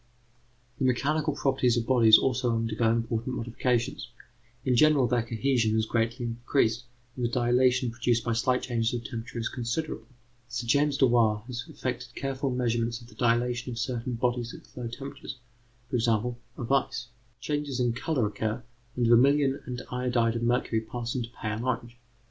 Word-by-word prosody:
The 135 - +1
mechanical 140 +5 +1
properties 130 -3 +2
of 115 - 0
bodies 115 -4 +7
also 120 -2 +1
undergo 115 0 +1
important 115 +2 -1
modifications. 120 +1 -1 0.6
In 130 -2 +3
general, 150 0 +5
their 120 0 +2
cohesion 115 -1 +1
is 110 - +2
greatly 115 +2 -1
increased, 120 0 0 0.3
and 125 - -4
the 120 - +2
dilatation 125 0 +2
produced 120 -1 0
by 120 - 0
slight 125 +2 +1
changes 115 -1 0
of 120 - -4
temperature 115 +1 -6
is 115 0 -1
considerable. 130 +5 -3 0.4
Sir 120 0 -4
James 140 +3 +2
Dewar 115 -5 +3
has 120 -1 -5
effected - - -5
careful 135 0 -2
measurements 120 -2 0
of 120 -1 -15
the - - -15
dilatation 120 +2 +1
of - - -7
certain 120 +2 -2
bodies 120 0 -1
at - - -16
low 125 -2 -4
temperatures: 135 +2 -7 0.5
for 125 0 -1
example, 115 +1 0 0.2
of 120 +2 -4
ice. 125 -2 0 0.3
Changes 145 -1 -2
in 120 -2 +2
colour 130 -1 0
occur, 110 +3 -2 0.3
and 120 - +1
vermilion 135 +4 +4
and 125 0 -5
iodide 125 -2 +1
of 115 - -2
mercury 120 -1 +1
pass 120 +1 -5
into 120 -3 -3
pale 110 +1 -3
orange. 120 -1 -2
120 Hz, 165 wpm, -28 LUFS, 115-125 Hz, 0.6 s, bodies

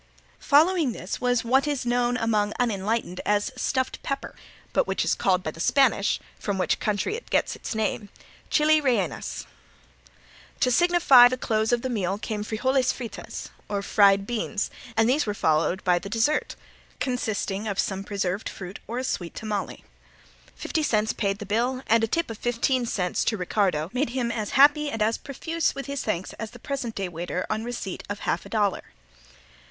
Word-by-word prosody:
Following 310 -2 +4
this 185 - -5
was 245 -2 +2
what 265 +5 +3
is 285 -4 -1
known 245 0 +1
among 215 -3 +1
unenlightened 215 -4 -1
as 205 +3 +1
"stuffed 260 +1 -1
pepper," 275 0 -4 0.4
but - - +2
which - - 0
is - - +2
called 185 -1 +1
by 155 - -2
the 165 - -14
Spanish, 235 -1 +3 0.2
from 200 -2 -2
which 185 - +1
country 210 - -1
it 480 - -9
gets - - +1
its - - -6
name, 215 -1 -1 0.4
"chili 305 0 +4
reinas." 235 - -1 1.2
To 250 - +3
signify 340 -5 +7
the 255 +1 -2
close 220 -2 0
of 240 -1 +1
the - - 0
meal 195 -4 -1
came 210 0 -4
frijoles 255 +5 +1
fritas 240 -4 -7 0.2
or 200 -1 -2
fried 200 -1 +4
beans, 215 -2 -2 0.3
and 225 0 +4
these 270 +1 +2
were 205 - -1
followed 165 +2 +1
by 180 -1 +3
the 200 - -8
dessert 230 +8 +1 0.4
consisting 220 -5 -2
of 200 -2 -2
some 195 0 -1
preserved 200 -1 -2
fruit 190 0 -8
or 235 - -4
of - - 0
a - - -2
sweet 175 -2 -3
tamale. 210 -3 -4 0.7
Fifty 320 - -2
cents 220 -7 +1
paid 200 -2 -1
the 210 - -7
bill 245 +5 0
and 225 +1 +3
a - - +3
tip 330 +2 -1
of 220 - -8
fifteen 240 +1 0
cents 180 -5 -1
to 220 - 0
Ricardo 180 -3 0
made 255 0 0
him 240 -1 -1
as 215 -3 -3
happy 295 +2 +6
and 225 - -4
as 220 +1 0
profuse 325 +4 -2
with 275 -1 -5
his 280 0 -3
thanks 190 -4 -3
as 225 - -4
the 240 - -13
present 245 -2 -4
day 195 -1 -2
waiter 175 +1 -4
on 220 - -1
receipt 235 -6 -5
of 205 0 -4
half - - -1
a - - -14
dollar. 205 -4 +1
225 Hz, 185 wpm, -25 LUFS, 200-255 Hz, 1.2 s, signify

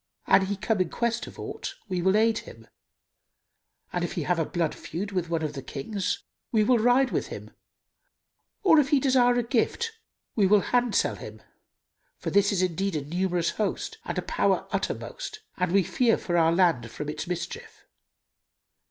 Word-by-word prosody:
An 190 - +4
he 200 - -1
came 200 0 0
in 180 - 0
quest 235 0 -1
of - - -12
aught, 390 - -6
we 185 -3 -1
will 190 +3 +3
aid 225 +1 +3
him, 115 0 -13 1.3
and 175 - -1
if 175 - -2
he 170 - -2
have 175 +2 +1
a 165 - +1
blood 170 -1 -1
feud 200 +5 -5
with 180 -3 -2
one 165 -1 -1
of 150 -1 -2
the 135 - -6
Kings, 185 - -3 0.3
we 220 -2 +4
will 240 +2 +4
ride 245 +3 +4
with - - -1
him; - - -8 1.1
or, 320 -5 +7
if 275 -2 +2
he 285 - +4
desire 255 -2 +4
a 245 - +1
gift, 260 - 0 0.4
we 205 -4 +4
will 205 +1 +5
handsel 245 -2 +2
him; - - -10 0.7
for - - -4
this 200 0 +4
is 185 -2 +1
indeed 185 +1 -1
a 145 -2 -2
numerous 175 +1 0
host 220 - -3
and - - -4
a - - -1
power - - +1
uttermost, 430 0 -4 0.2
and 180 -2 0
we 195 0 +4
fear 235 +6 +2
for 175 - -3
our 165 -1 +4
land 165 -10 +2
from 145 +6 -6
its 150 +2 -4
mischief." 175 -1 -6
195 Hz, 185 wpm, -27 LUFS, 170-235 Hz, 1.3 s, or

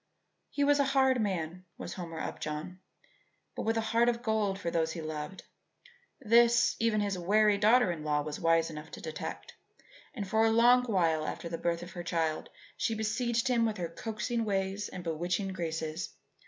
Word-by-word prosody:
He 285 - -1
was 290 0 +4
a - - +5
hard 265 -2 +4
man 180 -3 -3
was - - -6
Homer 165 -3 -6
Upjohn, 155 +5 -5 0.8
but - - -3
with 225 0 +2
a - - +2
heart 235 +1 +4
of 235 0 -2
gold 215 -4 0
for 170 -4 -3
those 160 -1 0
he - - -6
loved. 155 +3 -6 0.8
This, 235 0 +4
even 225 -2 +2
his 200 -3 -1
wary 205 +3 +3
daughter 220 -1 +5
in 160 -3 -5
law 150 -1 +1
was 150 0 -5
wise 165 0 +2
enough 150 0 -8
to - - -7
detect, 155 -1 -6 0.6
and 205 -5 -4
for 220 +3 +2
a 225 - +5
long 240 +2 +5
while 165 -8 +1
after 170 - -5
the 165 - -4
birth 170 0 -1
of 175 - -9
her 175 - -6
child 165 -2 -1 0.3
she 225 - -1
besieged 225 +2 0
him 240 -2 +2
with 220 -2 0
her 170 -2 -3
coaxing 225 +5 -3
ways 195 -1 -1
and 180 - -7
bewitching 175 +4 -1
graces. 160 -2 -3
195 Hz, 185 wpm, -30 LUFS, 165-225 Hz, 0.8 s, a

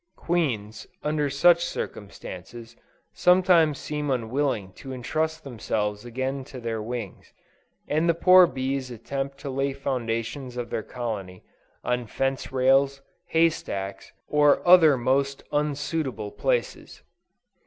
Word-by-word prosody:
Queens, 120 -12 -2 0.2
under 150 -1 0
such 170 +5 +4
circumstances, 115 - -7 0.4
sometimes 180 -5 +4
seem 150 -1 -4
unwilling 125 -5 -1
to 135 - -10
entrust 155 +5 -2
themselves 105 -4 -3
again 130 +3 -3
to 130 0 -10
their 115 -2 -3
wings, 115 -3 -6 0.6
and 160 +3 +1
the 165 - +3
poor 185 +1 +7
bees 130 -2 -3
attempt 135 +4 -5
to 140 - -9
lay 135 +1 -1
the 135 - -16
foundations 125 0 -3
of 120 -2 -4
their - - -1
colony, 105 -6 -6 0.4
on 125 -1 -1
fence 135 +4 -2
rails, 135 +1 +3 0.2
hay 165 +1 +4
stacks, 100 -11 -5 0.2
or 150 +2 +3
other 165 -6 +7
most 135 +3 0
unsuitable 145 -6 -2
places. - - -2
135 Hz, 120 wpm, -25 LUFS, 115-150 Hz, 0.6 s, poor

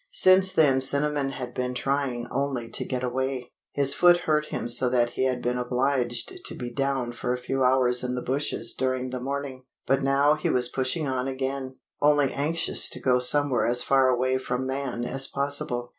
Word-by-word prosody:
Since 185 - +5
then 135 -4 +3
Cinnamon 140 +1 +1
had 125 -2 -7
been 125 0 -3
trying 135 -2 -2
only 130 -3 -2
to - - -1
get 130 -1 -3
away. 130 0 -3 0.2
His 140 -1 +4
foot 175 +1 +5
hurt 150 -2 +1
him - - -4
so 125 +1 +2
that 120 -1 +1
he 130 - -1
had 125 -1 -1
been 125 0 -1
obliged 125 -1 -1
to - - -5
be 120 -1 -6
down 135 -2 -1
for 125 +1 -3
a - - -2
few 130 +2 -2
hours 125 -1 +2
in 125 0 -2
the 125 - -4
bushes 140 +3 -2
during 130 -1 -2
the 125 - -4
morning; 135 -1 -5 0.2
but 135 0 +1
now 140 +2 +3
he 155 - -2
was 125 -1 +3
pushing 135 +5 -1
on 130 0 -2
again, 130 0 -4 0.3
only 145 -2 +3
anxious 155 +4 -1
to - - -5
go 125 -1 +2
somewhere 130 0 +3
as 120 +1 +1
far 135 -1 +3
away 130 +1 +1
from 130 0 -3
man 130 -2 -3
as 135 +2 +1
possible. 140 -3 -2
130 Hz, 195 wpm, -25 LUFS, 125-140 Hz, 0.3 s, Since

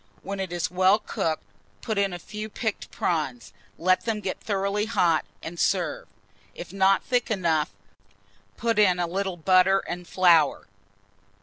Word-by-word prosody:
When 200 +1 -5
it 190 -2 -3
is 175 -1 -2
well 185 +3 +4
cooked, 165 -6 -3 0.4
put 220 -3 -1
in 200 -1 +1
a 175 - -5
few 215 +5 -7
picked 220 0 -4
prawns; 145 -8 -2 0.2
let 185 +2 +2
them 225 -2 -1
get 195 -2 -4
thoroughly 200 0 -1
hot, 170 -8 +2 0.2
and 170 +1 -7
serve. - - 0 0.5
If - - -9
not 195 0 +3
thick 245 -1 0
enough, 170 -7 +1 0.9
put 230 -2 0
in 185 -4 +5
a 175 - 0
little 190 +1 -3
butter 185 +3 +4
and 175 0 -5
flour. 170 -5 +4
190 Hz, 150 wpm, -25 LUFS, 175-210 Hz, 0.9 s, in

